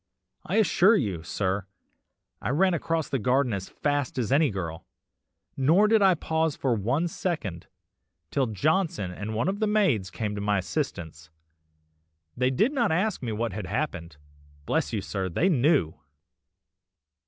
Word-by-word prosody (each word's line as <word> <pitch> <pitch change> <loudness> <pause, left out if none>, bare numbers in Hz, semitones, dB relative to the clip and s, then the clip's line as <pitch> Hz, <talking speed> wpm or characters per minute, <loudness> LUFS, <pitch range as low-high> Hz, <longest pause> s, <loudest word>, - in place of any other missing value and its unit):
I 175 - -3
can 220 - +5
assure 200 +3 +4
you, 100 - -1
sir, 95 +2 -2 0.7
I - - -2
ran 185 +7 +3
across 165 -1 -1
the 135 - -1
garden 125 +2 +1
as 95 -1 -4
fast 145 -3 -2
as 120 -3 -1
any 145 +1 +4
girl, 85 -5 -5 0.7
nor 165 +10 +4
did 220 0 +4
I 190 -2 +5
pause 160 -1 -1
for 130 -3 0
one 125 - 0
second, 155 - -4 0.6
till 135 -2 +1
Johnson 110 - 0
and 105 +4 -5
one 115 - 0
of 195 +2 -1
the 215 - +1
maids 190 - +2
came 105 +2 -3
to 100 - -4
my 105 0 +1
assistance. 85 - -4 1.1
They 125 +1 +2
did 215 - +2
not 245 - +1
ask 190 +5 0
me 120 -3 -3
what 110 -1 -2
had 100 -2 -5
happened, 85 - -3 0.5
bless - - 0
you - - -2
sir, 95 -1 -3
they 165 - +1
knew! 140 - +2
130 Hz, 160 wpm, -26 LUFS, 100-165 Hz, 1.1 s, can